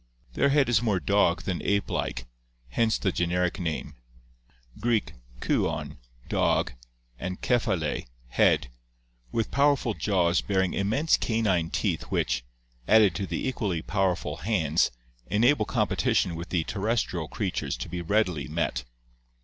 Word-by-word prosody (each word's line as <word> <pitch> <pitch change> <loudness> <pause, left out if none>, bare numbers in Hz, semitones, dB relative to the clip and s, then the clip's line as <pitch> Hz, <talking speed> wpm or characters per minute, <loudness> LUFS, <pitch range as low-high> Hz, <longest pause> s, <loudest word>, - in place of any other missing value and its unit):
Their 140 - +3
head 140 -1 +3
is 120 -3 +3
more 105 -6 +1
dog 100 -2 +2
than 90 -3 -2
ape 100 0 +1
like, 60 0 -2 0.4
hence 110 - +1
the 95 - 0
generic 90 +1 0
name 80 -3 -3 0.9
(Gr. 120 +2 +2 0.5
kwdv, - - -1 0.3
dog, - - +1 0.5
and 90 +1 -4
K€<f>a\i]} 95 - 0 0.2
head), 75 0 +3 0.6
with 115 -1 -1
powerful 140 -4 +2
jaws 90 -4 +1
bearing 95 -2 0
immense 115 +11 +2
canine 100 -8 +1
teeth - - -1
which, - - 0 0.4
added 110 -5 +6
to 100 +1 -3
the - - -2
equally 100 -10 -2
powerful 95 -3 -1
hands, 85 - +1 0.4
enable 115 - +3
competition 90 - +1
with 85 +2 -6
the 85 -3 +1
terrestrial 100 -5 -1
creatures 95 - -3
to - - -5
be 90 +1 -4
readily 90 -5 0
met. 75 -7 -2
95 Hz, 130 wpm, -27 LUFS, 85-110 Hz, 0.9 s, added